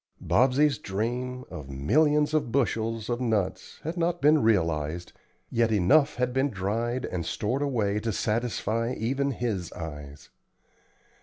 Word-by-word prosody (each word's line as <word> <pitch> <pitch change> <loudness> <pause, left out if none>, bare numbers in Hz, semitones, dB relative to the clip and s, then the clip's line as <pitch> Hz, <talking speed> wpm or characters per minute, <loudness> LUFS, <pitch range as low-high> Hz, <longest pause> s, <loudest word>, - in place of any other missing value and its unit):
Bobsey's 135 +1 +3
dream 125 +6 -3
of 70 -2 -8
"millions 150 - +2
of 150 -6 0
bushels" 115 -4 0
of 120 0 -2
nuts 105 -6 -1
had 165 +4 -4
not 175 +1 0
been 150 0 +5
realized, 85 -5 0 0.4
yet 115 -1 +2
enough 135 - +4
had 125 0 -1
been 135 +2 +2
dried 115 +5 -2
and 90 -2 -3
stored 115 - -2
away 110 -8 0
to 115 +1 -2
satisfy 115 +2 -1
even 135 +5 0
his 115 -9 -3
eyes. 75 -3 -8
115 Hz, 135 wpm, -27 LUFS, 100-135 Hz, 0.4 s, been